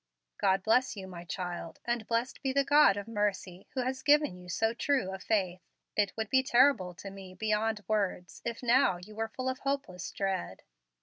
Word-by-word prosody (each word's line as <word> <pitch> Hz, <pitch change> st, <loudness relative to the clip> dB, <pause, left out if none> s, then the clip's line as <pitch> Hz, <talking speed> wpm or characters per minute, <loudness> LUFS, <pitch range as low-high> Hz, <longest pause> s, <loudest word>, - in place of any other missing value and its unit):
"God 190 Hz, 0 st, +2 dB
bless 245 Hz, +2 st, +2 dB
you, 190 Hz, -, -6 dB
my 175 Hz, -2 st, -9 dB
child; 175 Hz, -2 st, -5 dB
and 240 Hz, -2 st, -1 dB
blessed 235 Hz, +2 st, -1 dB
be 270 Hz, -, 0 dB
the 280 Hz, +1 st, +3 dB
God 285 Hz, -8 st, +5 dB
of 205 Hz, +1 st, -5 dB
mercy 200 Hz, -4 st, -2 dB
who 260 Hz, -, +1 dB
has 260 Hz, +1 st, -2 dB
given 295 Hz, -8 st, +4 dB
you 180 Hz, 0 st, -12 dB
so 225 Hz, +5 st, +1 dB
true 255 Hz, -5 st, 0 dB
a 190 Hz, -, -6 dB
faith. 185 Hz, -3 st, 0 dB, 0.3 s
It 205 Hz, 0 st, +1 dB
would 220 Hz, -1 st, -3 dB
be 265 Hz, -, +5 dB
terrible 245 Hz, -8 st, +3 dB
to 195 Hz, +2 st, -8 dB
me 190 Hz, -1 st, -10 dB
beyond 215 Hz, +1 st, 0 dB
words 200 Hz, -4 st, -1 dB
if 235 Hz, +1 st, -4 dB
now 245 Hz, -5 st, +4 dB
you 185 Hz, +5 st, -12 dB
were 225 Hz, +1 st, -2 dB
full 255 Hz, +3 st, -5 dB
of 260 Hz, 0 st, -1 dB
hopeless 235 Hz, -10 st, -3 dB
dread." 190 Hz, -, -3 dB
215 Hz, 195 wpm, -31 LUFS, 185-255 Hz, 0.3 s, God